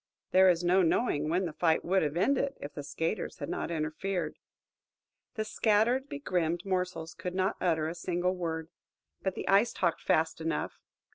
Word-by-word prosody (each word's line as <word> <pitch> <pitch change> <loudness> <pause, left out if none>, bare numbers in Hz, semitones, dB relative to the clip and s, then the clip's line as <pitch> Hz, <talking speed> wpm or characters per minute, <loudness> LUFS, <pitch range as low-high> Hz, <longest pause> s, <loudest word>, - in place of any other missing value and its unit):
There 190 0 +7
is 175 -1 +2
no 180 +2 +4
knowing 160 -4 +1
when 180 +3 +1
the 165 - -4
fight 160 0 +2
would 190 +2 +3
have 150 +1 -1
ended, 275 +7 +1
if 145 - -7
the 145 - -5
skaters 165 +7 -3
had - - -5
not - - -3
interfered. 165 +4 -2 1.0
The 215 -2 -2
scattered, 225 +5 +2
begrimed 175 - -1
morsels 180 -4 -2
could 180 0 -5
not 190 +2 +1
utter 160 -3 +1
a 165 - -3
single 180 +1 -1
word. 165 -2 -3 0.5
But 190 -1 -2
the - - -5
Ice 200 +4 +4
talked 170 -3 0
fast 160 +1 +1
enough. 160 -1 -2
180 Hz, 170 wpm, -30 LUFS, 160-195 Hz, 1.0 s, There